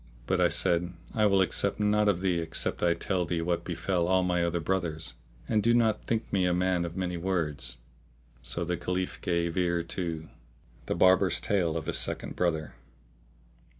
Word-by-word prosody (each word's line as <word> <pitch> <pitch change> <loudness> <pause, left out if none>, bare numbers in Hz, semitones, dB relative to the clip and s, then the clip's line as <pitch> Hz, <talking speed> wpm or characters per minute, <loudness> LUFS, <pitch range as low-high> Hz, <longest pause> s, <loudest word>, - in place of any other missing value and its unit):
But - - +1
I - - +6
said, 85 +1 +1 0.2
"I 110 -2 +3
will 100 -1 +4
accept 95 - +1
naught 105 0 +3
of 90 -3 +1
thee 90 -3 +1
except 80 -1 -2
I 85 -1 +3
tell 90 +1 -1
thee 85 -1 -2
what 85 0 -1
befell 90 -3 -1
all 95 0 +3
my 90 -1 +1
other 85 0 0
brothers; 80 -4 -1 0.3
and 110 -2 +2
do 115 +2 +3
not 110 -3 +1
think 115 -1 -2
me 95 -2 +3
a 90 -1 +2
man 90 -1 +1
of 85 +1 -6
many 90 -2 -2
words." 85 -7 -2 0.6
So 85 +7 -2
the 90 +1 -1
Caliph 90 +1 -3
gave 85 -1 0
ear 85 -2 +1
to 85 -2 -3 0.6
The - - 0
Barber's 95 0 +4
Tale 85 -6 0
of 80 - -4
his - - 0
Second - - -3
Brother. 80 -3 -1
90 Hz, 185 wpm, -29 LUFS, 85-95 Hz, 0.6 s, I